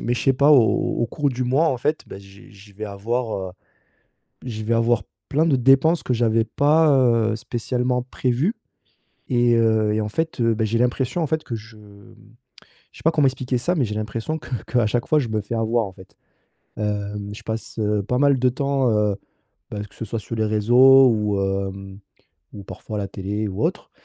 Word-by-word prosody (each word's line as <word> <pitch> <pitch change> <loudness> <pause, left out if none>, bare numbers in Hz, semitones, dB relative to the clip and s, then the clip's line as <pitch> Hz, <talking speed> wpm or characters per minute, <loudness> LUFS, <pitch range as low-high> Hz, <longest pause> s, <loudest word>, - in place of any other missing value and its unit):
mais 120 +1 0
je - - -3
sais 135 - +4
pas 140 +3 +3
au 135 -6 +7 0.4
au - - +1
cours 145 +4 -1
du 125 -1 -3
mois, 140 +6 +2
en 130 - 0
fait, 150 +5 -2
bah 95 - -9
j'ai 100 +2 -16
j'ai 100 0 -17
je - - -25
vais 110 +1 -6
avoir, 110 +4 -3
heu, - - -17 0.9
je 110 -3 -5
vais 110 - -2
avoir 115 0 +2 0.3
plein 155 +4 +1
de 145 - +3
dépenses 135 +7 +4
que 125 - -2
j'avais 115 -1 +2
pas, 150 +5 +3 0.4
heu, - - -2
spécialement 125 +1 -2
prévues 130 - -1 0.8
et 120 -1 +3
heu, 110 -2 +2
et 110 - 0
en 105 - -3
fait, 160 +2 -3
heu, 115 -1 +3
bah, 110 0 0
j'ai 115 +2 0
l'impression 125 +6 0
en 155 - 0
fait 160 +1 -1
que 120 - -6
je, 110 0 -11
mmh, 100 +1 -17 0.8
je - - -16
sais - - -13
pas 165 - +5
comment 150 -3 +3
expliquer 130 -1 -2
ça 175 +9 0
mais 140 - +1
j'ai 105 - -5
l'impression 110 +8 -4
que - - -13 0.2
qu'à 120 -3 +1
chaque 120 +2 -1
fois 155 - +3
je 125 - -3
me 110 -1 -1
fais 105 +4 -6
avoir 115 0 0
en 95 - -9
fait. 95 0 -17 0.6
Hem, 105 -1 -3
je - - -12
passe, 110 +1 -6
heu, 105 -1 0
pas 125 +5 -2
mal 140 -2 +3
de 125 0 +3
temps, 135 0 0
heu, 105 -2 +1 0.6
bah, 105 -1 -5
que 100 - -16
ce - - -6
soit 110 +1 -4
sur 115 - -7
les 110 - 0
réseaux 125 +5 +6
ou 105 -3 0
hem, 95 0 -4 0.5
ou 100 -2 -10
parfois 105 +2 -7
la 100 - -2
télé 105 +3 -4
ou 95 - -4
autre - - -3
115 Hz, 215 wpm, -22 LUFS, 105-130 Hz, 0.9 s, au